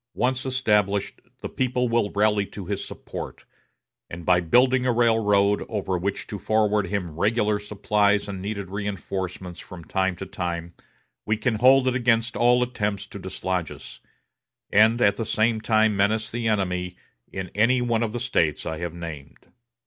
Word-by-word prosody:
Once 130 +1 0
established, 105 -6 0 0.2
the - - -4
people 125 -1 -1
will 115 -3 +1
rally 105 0 +3
to 100 -1 -9
his 100 +1 -3
support, - - -8 0.6
and 85 0 -8
by 90 -1 +4
building 125 +9 +3
a 125 - +2
railroad, 105 -4 +3
over 100 -4 -2
which 95 +3 -2
to 105 - -6
forward 105 0 +1
him 90 -5 -3
regular 105 0 +1
supplies 105 0 +1
and 95 -2 -5
needed 100 -2 -5
reinforcements 95 -3 -4
from 90 -2 -10
time 95 +2 0
to 95 - -7
time, 85 -2 -4 0.5
we 110 0 0
can 115 +2 0
hold 130 +3 +5
it 130 - +2
against 120 -2 +1
all 125 +1 +4
attempts 105 -5 -2
to - - -10
dislodge 90 -4 -3
us, - - -11 0.7
and 110 +3 +5
at 100 0 +3
the 115 - -1
same 110 0 +1
time 110 -1 +3
menace 105 +3 +1
the 115 -1 -2
enemy 90 -4 -1 0.4
in 95 -2 -5
any 115 +5 +3
one 120 -2 0
of 115 -2 -1
the 120 - -4
States 85 - 0
I 80 -1 -4
have 85 -1 -4
named. 80 -5 -9
105 Hz, 165 wpm, -24 LUFS, 95-115 Hz, 0.7 s, hold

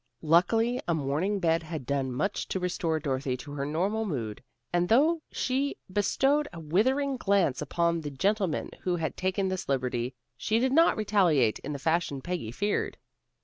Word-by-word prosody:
Luckily 185 +10 +3
a 170 - +2
morning 155 +7 0
in 200 - -1
bed 165 -2 +2
had 160 -4 -6
done 135 -1 -1
much 170 +11 -2
to 190 - -2
restore 170 -3 -1
Dorothy 135 -3 -2
to 135 +3 -9
her 140 -1 -3
normal 195 +9 0
mood, 120 - -4 0.3
and 175 0 +2
though 310 +8 +4
she 270 +2 -1 0.2
bestowed 270 +9 +2
a 170 - -8
withering 260 - +1
glance 195 - +2
upon 170 +3 0
the 150 - -4
gentleman 190 - 0
who 180 -1 0
had 165 -2 -2
taken 190 +1 0
this 185 -3 -4
liberty, 125 -2 -1 0.2
she 220 - 0
did 255 +2 +2
not 330 +4 +5
retaliate 180 - +3
in 150 - -6
the 145 - -3
fashion 160 -1 0
Peggy 170 -5 -4
feared. 205 - -1
175 Hz, 175 wpm, -28 LUFS, 145-210 Hz, 0.3 s, not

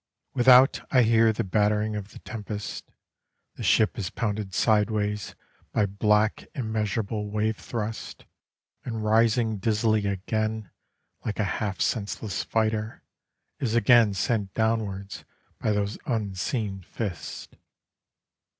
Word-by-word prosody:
Without 130 +1 +6
I 130 -3 +5
hear 115 0 +5
the 105 - -2
battering 105 +2 +1
of 105 -1 -5
the - - -13
tempest, 105 -2 -6 0.6
The - - -11
ship 110 +1 +3
is 95 -3 -2
pounded 105 -3 -3
sideways 105 0 +1 0.4
by 105 - +3
black 105 +2 +1
immeasurable 110 -3 -2
wave 110 +1 0
thrusts, 110 -1 -5 0.6
And 115 -3 -4
rising 110 0 +3
dizzily 110 0 +1
again, 110 +2 -2 0.5
like 105 - -3
a - - +3
half 100 0 -2
senseless 105 -2 -1
fighter, 110 -1 -1 0.6
Is 115 -3 -1
again 115 -2 +5
sent 100 0 -1
downwards, 105 -3 -1 0.4
by 110 - 0
those 105 0 -1
unseen 105 -2 -2
fists. 95 0 -6
110 Hz, 115 wpm, -26 LUFS, 105-110 Hz, 0.6 s, Without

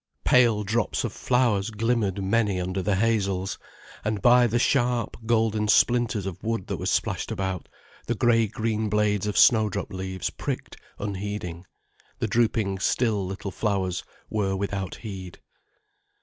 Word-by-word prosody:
Pale 115 -4 +4
drops 110 +1 0
of - - -3
flowers 120 -5 +1
glimmered 110 -3 0
many 100 -1 +1
under 95 +2 -2
the 100 +2 +1
hazels, 100 -3 0 0.4
and 105 -1 -1
by 120 +4 +6
the 115 +1 0
sharp, 120 -3 +1
golden 110 -2 +2
splinters 120 -2 +3
of 95 -3 -6
wood 115 -3 -2
that - - -3
were - - -4
splashed - - 0
about, 95 -1 -3 0.4
the 120 - 0
grey 115 -1 +3
green 110 +1 -2
blades 105 -1 +1
of 105 - -2
snowdrop 110 -6 +4
leaves 95 0 -3
pricked - - -5 0.2
unheeding, 100 -3 -5 0.5
the - - -1
drooping 110 -4 +1
still 105 -2 +1
little 95 +1 -5
flowers 95 -5 -1 0.2
were 100 -3 -1
without 95 -1 -3
heed. 95 -5 -8
105 Hz, 140 wpm, -25 LUFS, 95-115 Hz, 0.5 s, by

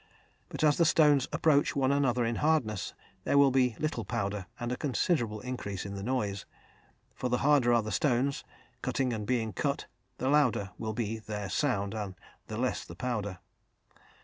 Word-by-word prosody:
But - - -4
as 150 -1 +4
the 170 - +4
stones 150 -4 +4
approach 150 -2 +3
one 135 -1 +2
another 125 -4 +2
in 115 0 -1
hardness, 145 - 0 0.3
there - - +2
will 140 -1 +6
be 125 -3 +2
little 155 0 -2
powder 100 -4 -3
and 120 0 -3
a - - 0
considerable 125 - 0
increase 120 -7 -5
in 100 - -5
the 100 - -5
noise; 105 -4 -2 0.7
for 125 - -3
the 125 - +2
harder 140 -5 +5
are 120 -1 +4
the 110 - -4
stones, 140 +1 +1 0.4
cutting 130 -2 0
and 105 -2 -4
being 115 -4 0
cut, - - -1 0.3
the 130 - -2
louder 125 -9 +2
will 110 -1 -3
be 115 0 -2
the 105 -2 -5
sound 100 -4 0
and 105 -4 -4 0.3
the 110 - -5
less 125 +1 -1
the 85 - -11
powder. 105 -3 -3
120 Hz, 175 wpm, -30 LUFS, 105-140 Hz, 0.7 s, will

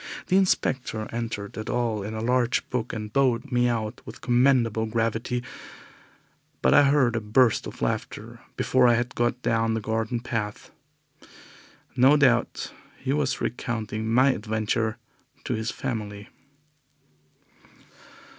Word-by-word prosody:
The 185 - +3
inspector 130 - +1
entered 115 -3 -4
it 110 - -5
all 120 -4 0
in 105 +3 -5
a 110 - -3
large 125 0 +1
book 125 -2 -2
and 105 -1 -6
bowed 130 -4 +1
me 125 0 +3
out 110 -1 -3
with - - -10
commendable 120 -3 +2
gravity, 115 +2 -1 1.2
but 65 - +4
I - - +8
heard 130 -5 +3
a 115 - -1
burst 110 +2 +2
of - - -7
laughter - - -3 0.2
before 130 -1 +3
I 120 - +5
had 120 +1 -2
got 120 +1 0
down 115 0 +1
his 110 - -3
garden 110 +2 -1
path. 110 -3 -4 1.2
No 135 +4 +6
doubt 125 -4 +1 0.2
he 135 +1 -2
was 145 -3 0
recounting 110 -2 -3
my 130 +4 +5
adventure 110 0 -1 0.5
to 130 - -2
his 110 0 -2
family. 105 -6 -5
115 Hz, 135 wpm, -25 LUFS, 110-125 Hz, 1.2 s, I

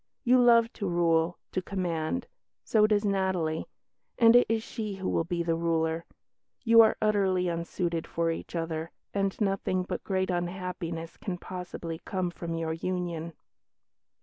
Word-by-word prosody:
You 250 +1 +5
love 235 -1 +5
to 200 - -3
rule, 170 0 +2
to 185 - -1
command. 180 +2 -2 0.4
So 215 -1 +4
does 210 -1 +2
Natalie; 190 -5 0 0.5
and 230 -1 +7
it 245 - +6
is 225 -1 +1
she 215 -4 -5
who 190 -1 -4
will - - +1
be 170 0 -1
the 165 0 +1
ruler. 165 0 0 0.6
You 230 -1 +8
are 220 - +4
utterly 195 -4 +2
unsuited 170 0 -2
for 165 0 0
each 165 - -6
other, 165 -1 -3 0.2
and 195 -1 -1
nothing 195 -3 0
but 180 -1 -5
great 190 -1 0
unhappiness 175 -2 -4
can 190 -5 -4
possibly 175 -2 -6
come 185 -2 -2
from 170 -1 -5
your 165 -1 -2
union." 170 -1 -3
180 Hz, 150 wpm, -29 LUFS, 165-200 Hz, 0.6 s, You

